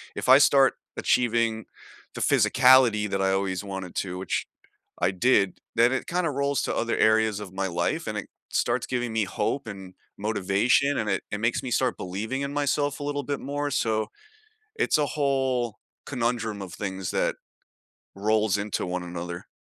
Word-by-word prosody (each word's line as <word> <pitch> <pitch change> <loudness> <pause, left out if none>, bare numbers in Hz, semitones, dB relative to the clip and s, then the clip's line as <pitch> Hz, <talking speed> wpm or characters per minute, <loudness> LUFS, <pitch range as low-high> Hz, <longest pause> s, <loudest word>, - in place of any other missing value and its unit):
if - - -3
I 130 - +10
start 135 -3 +5 0.2
achieving 115 -2 +1 0.5
the - - -5
physicality 125 -5 +5
that 95 0 -1
I 95 0 +2
always 95 0 -1
wanted 95 -3 -6
to- 90 -1 -3
which, 95 - -2 0.6
I 90 - +4
did- 100 -1 +2 0.2
then 120 +1 +5
it 130 - -2
kinda 175 -1 0
rolls 140 0 0
to - - -2
other 115 - 0
areas 110 -1 +3
of 100 -3 -8
my 95 0 -2
life 85 - -1
and - - -3
it - - -6 0.2
starts 120 +1 0
giving 120 -2 -2
me 110 -1 +1
hope, 105 +7 -2
and 95 -3 -9 0.2
motivation, 110 +7 +2
and 105 -2 -1
it 95 - 0
it 105 - -2
makes 115 +2 0
me 125 - -4
start 130 +3 +1
believing 110 +9 -4
in 140 0 -3
myself 145 0 0
a - - -5
little 145 0 -2
bit 145 +1 -3
more, 145 +1 -3
so 110 -4 0 0.7
it's - - +2
a 150 - +2
whole 130 -6 0 0.3
conundrum 115 -5 -2
of 90 -2 -8
things 95 -2 -4
that - - 0 0.8
rolls 105 0 +1
into 100 0 -2
one 90 0 -3
another. 85 0 -6
110 Hz, 175 wpm, -26 LUFS, 95-130 Hz, 0.8 s, I